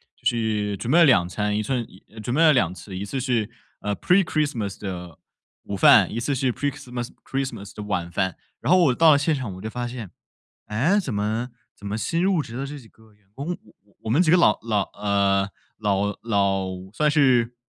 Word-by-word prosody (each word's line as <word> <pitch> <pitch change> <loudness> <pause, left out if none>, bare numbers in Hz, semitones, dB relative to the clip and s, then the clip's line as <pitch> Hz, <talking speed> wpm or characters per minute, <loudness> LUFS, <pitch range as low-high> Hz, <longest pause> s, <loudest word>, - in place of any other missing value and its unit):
就 - - -30
是 105 -3 0
准 120 +5 -3
备 170 - +6
了 170 - +8
2 90 - +4
餐， 105 +3 -1
一 110 - -1
寸 120 +2 -1
一 95 - -18 0.2
准 120 +4 -3
备 160 - +3
了 160 -2 +7
2 95 - +2
次， 95 0 -10
一 95 - -4
次 105 +7 -4
是， 120 -4 0 0.3
呃， 105 -1 -2
Pre-Christmas 150 - +1
的 90 -4 -6 0.5
午 100 - -5
饭， 95 - +6
一 115 - -2
次 135 +4 -1
是 130 -1 0
Pre-Christmas 125 -3 -4
Christmas 135 -7 -4
的 - - -6
晚 90 -4 -3
饭。 95 -3 -1 0.3
然 - - 0
后 185 - +7
我 135 - +4
到 160 +4 +6
了 145 - +6
现 145 +3 +1
场 130 -7 -3
我 95 - -10
就 110 - -5
发 120 0 -3
现， 115 -7 -7 0.6
诶， 145 - +2
怎 145 - -2
么 110 +4 -1 0.3
怎 100 - -11
么 105 +2 -3
新 165 +8 -1
入 190 -3 +2
职 120 -5 -7
的 135 +2 -3
这 145 +1 -7
几 120 -5 -15
个 110 -1 -23
员 105 -1 -31
工， 160 +6 -4 0.5
我 - - -5
们 145 +11 +4
几 155 - +2
个 180 - +6
老 105 -11 +4
老 105 -4 0
呃， 100 -1 +1 0.3
老 100 -1 0
老 100 -4 +1 0.3
算 150 +6 +2
是， 125 -5 +3
115 Hz, 320 characters per minute, -24 LUFS, 100-140 Hz, 0.6 s, 了